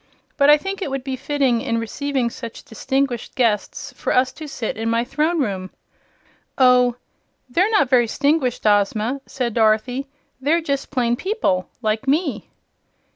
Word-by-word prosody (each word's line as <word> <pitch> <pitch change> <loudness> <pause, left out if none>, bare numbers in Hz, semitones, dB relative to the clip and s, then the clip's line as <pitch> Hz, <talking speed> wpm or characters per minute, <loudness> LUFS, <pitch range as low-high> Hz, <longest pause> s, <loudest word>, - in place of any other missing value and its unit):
But 285 0 +4
I 295 - +8
think 390 +5 -5
it 335 - -2
would 270 -1 -3
be 265 -1 -3
fitting, 265 -3 0
in 230 - -1
receiving 250 +2 -2
such 230 -2 -8
distinguished 265 +1 -2
guests, 225 -5 -1
for - - -3
us 255 0 +3
to 310 - -8
sit 250 -5 -4
in 225 +1 -2
my 230 +1 +1
Throne 305 +7 0
Room." 195 -8 -2 0.9
"Oh, 250 -2 +5 0.5
they're 355 - +2
not 415 - +3
very 245 -2 +4
'stinguished, 280 -1 0
Ozma," 215 +5 +2
said 245 -4 -3
Dorothy. 230 +5 +1 0.3
"They're 305 +5 +2
just 280 -4 -3
plain 240 -3 +1
people, 375 - -1
like 215 +4 -1
me." 285 - 0
255 Hz, 155 wpm, -21 LUFS, 230-285 Hz, 0.9 s, I